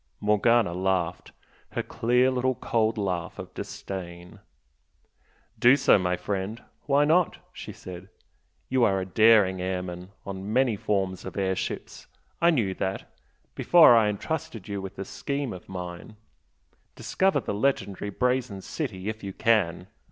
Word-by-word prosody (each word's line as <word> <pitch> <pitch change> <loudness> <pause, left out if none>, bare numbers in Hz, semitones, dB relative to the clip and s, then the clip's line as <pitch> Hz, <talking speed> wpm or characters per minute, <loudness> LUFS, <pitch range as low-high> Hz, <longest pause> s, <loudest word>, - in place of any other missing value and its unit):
Morgana 105 -1 +3
laughed, 90 -1 -1 0.4
her - - -1
clear 125 +3 +2
little 130 0 0
cold 110 -1 0
laugh 90 -5 -3
of - - -9
disdain. 90 -2 -7 1.2
"Do 125 +3 +7
so, 130 -6 +4
my 90 -1 0
friend! 100 +4 -3 0.3
Why 145 +1 +4
not?" 165 +3 +2 0.2
she - - -8
said 90 +1 -10 0.6
"You 130 -1 +2
are 95 -4 +3
a 95 - -3
daring 100 -2 +4
airman 90 -1 -4 0.2
on 100 +1 -6
many 125 -1 +2
forms 95 -2 -2
of 95 - -8
airships 95 -1 -3 0.3
I 170 - +5
knew 115 - +1
that, 95 0 -4 0.4
before 170 -8 +7
I 110 -2 +4
entrusted 110 - -4
you 100 -2 -4
with 95 -1 -8
the 95 - -5
scheme 140 +2 -4
of 90 - -11
mine. 90 +3 -7 0.8
Discover 190 0 +1
the - - -4
legendary 105 -4 -1
'Brazen 125 -2 -1
City' 105 - -5
if 110 0 -4
you 100 -1 -5
can! 95 -7 +1
100 Hz, 140 wpm, -26 LUFS, 95-120 Hz, 1.2 s, Do